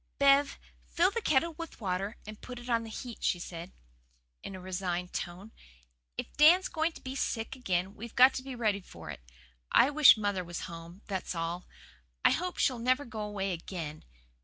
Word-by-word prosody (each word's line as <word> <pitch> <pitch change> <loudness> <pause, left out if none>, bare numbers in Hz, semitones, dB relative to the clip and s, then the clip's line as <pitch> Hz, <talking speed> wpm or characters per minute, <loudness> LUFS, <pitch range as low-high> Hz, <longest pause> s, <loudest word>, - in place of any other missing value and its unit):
"Bev, 280 0 +4 0.3
fill 355 +3 +3
the 465 - -2
kettle 325 -1 +2
with 330 - -7
water 195 +1 -2
and 215 0 -9
put 250 -1 -8
it 240 +1 -6
on 230 -1 +2
to - - -8
heat," 235 +1 -7
she - - +2
said 175 0 -7 0.7
in 195 - -7
a - - -7
resigned 180 -1 -3
tone. 185 +5 -5 0.7
"If - - -5
Dan's 340 +6 +7
going 320 0 0
to - - -13
be 260 - -5
sick 225 -3 -2
again 190 -6 -1
we've 230 +2 -9
got 255 +2 +8
to - - -3
be 265 -1 -7
ready 215 -4 0
for - - -10
it. - - -9 0.5
I 270 - +6
wish 295 -5 +8
mother 205 -3 -1
was 175 0 -6
home, 170 +2 -9
that's 190 -2 -3
all. 170 +2 -3 0.6
I - - +8
hope 360 +1 -1
she'll 255 -4 +2
never 255 +4 +2
go 220 -2 -6
away 200 -2 -2
again. 165 - -6
215 Hz, 190 wpm, -31 LUFS, 180-265 Hz, 0.7 s, got